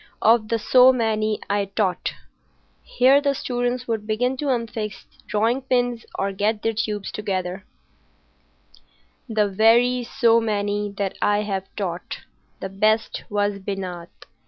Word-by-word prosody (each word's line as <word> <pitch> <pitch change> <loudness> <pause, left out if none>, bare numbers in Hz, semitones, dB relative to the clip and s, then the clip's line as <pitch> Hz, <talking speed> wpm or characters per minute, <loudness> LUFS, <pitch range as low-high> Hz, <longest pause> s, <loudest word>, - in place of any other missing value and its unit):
Of 225 0 +4
the 230 - 0
so 255 +3 +6
many 220 -3 0
I 200 0 0
taught,"—here 225 +6 -1
the 280 -1 +1
students 245 0 -2
would 220 -2 -2
begin 245 +4 0
to 295 - -4
unfix 230 -5 -3 0.2
drawing 225 +5 +1
pins 245 -2 -1
or 195 0 -1
get 210 +2 -1
their 225 - +1
tubes 210 -2 -3
together,—"the 190 -2 -3 1.8
very 235 +5 +3
so 230 -1 +3
many 205 -1 -1
that 200 -2 -2
I 205 0 +2
have 195 -2 -3
taught, 180 -3 -4 0.4
the 190 - -4
best 215 +3 0
was 205 -1 0
Binat. 185 -3 -5
215 Hz, 125 wpm, -23 LUFS, 200-240 Hz, 1.8 s, so